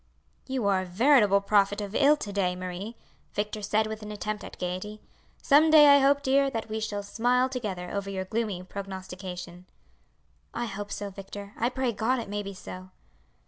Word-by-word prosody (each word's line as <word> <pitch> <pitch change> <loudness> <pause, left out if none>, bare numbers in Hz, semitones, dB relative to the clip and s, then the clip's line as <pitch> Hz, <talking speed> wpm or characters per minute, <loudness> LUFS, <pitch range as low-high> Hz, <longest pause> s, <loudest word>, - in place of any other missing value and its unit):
"You 260 -4 -2
are 195 -2 +3
a - - -5
veritable 205 +1 +4
prophet 205 0 +2
of 205 -1 -5
ill 295 +4 +5
to 205 -7 -6
day, 185 -3 0
Marie," 185 +5 -6 0.4
Victor 210 +1 -2
said 215 +2 +1
with 220 0 -5
an 210 0 -7
attempt 210 0 -4
at - - -10
gaiety. 185 +4 -4 0.4
"Some 305 +3 +6
day, 300 -2 +8
I - - +6
hope, 280 +1 +3
dear, 275 +1 +3
that 225 -3 -4
we 220 0 -2
shall 210 -2 -3
smile 245 +5 +2
together 205 -9 -4
over 200 -1 -3
your 190 -1 -3
gloomy 210 -3 -2
prognostication." 185 -2 -7 0.9
"I 240 - -1
hope 205 -1 -6
so, 205 -1 -4
Victor 200 +1 -9
I 235 - 0
pray 260 -1 -1
God 230 +4 0
it 230 -4 -5
may 205 0 -2
be 200 -1 -7
so!" 185 0 -9
205 Hz, 185 wpm, -27 LUFS, 195-235 Hz, 0.9 s, day